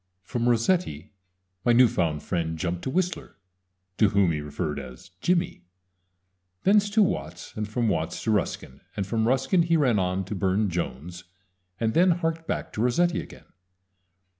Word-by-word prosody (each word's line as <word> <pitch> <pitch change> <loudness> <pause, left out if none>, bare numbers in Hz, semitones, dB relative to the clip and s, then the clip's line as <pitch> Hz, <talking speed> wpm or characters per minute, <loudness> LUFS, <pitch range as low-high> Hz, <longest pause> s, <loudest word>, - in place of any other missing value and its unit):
"] 90 - -49
From 120 +5 -1
Rossetti 115 - 0 0.5
my 120 - +4
new 125 +1 +7
found 85 -10 -1
friend 80 -2 -2
jumped 85 +1 -2
to - - -1
Whistler 180 +4 -2 0.6
to 105 - +5
whom 100 -4 +3
he 75 -2 -2
referred 75 0 -3
as 65 -2 -11
"Jimmy" 175 - 0 1.0
thence 205 +1 +4
to 215 +1 +4
Watts, 85 - -3
and 105 -1 -3
from 115 +1 0
Watts 80 -4 -1
to 110 - +1
Ruskin; 80 -9 -2 0.2
from 110 +3 0
Ruskin 135 +8 +2
he 165 0 +2
ran 125 -8 +3
on 90 +1 -1
to 100 - -5
Burne 95 +1 +1
Jones, 85 +2 -5 0.5
and 110 -1 0
then 180 +3 +5
harked 165 -1 -1
back - - -3
to 110 - -2
Rossetti 175 +9 +2
again. - - -14
105 Hz, 165 wpm, -26 LUFS, -, 1.0 s, new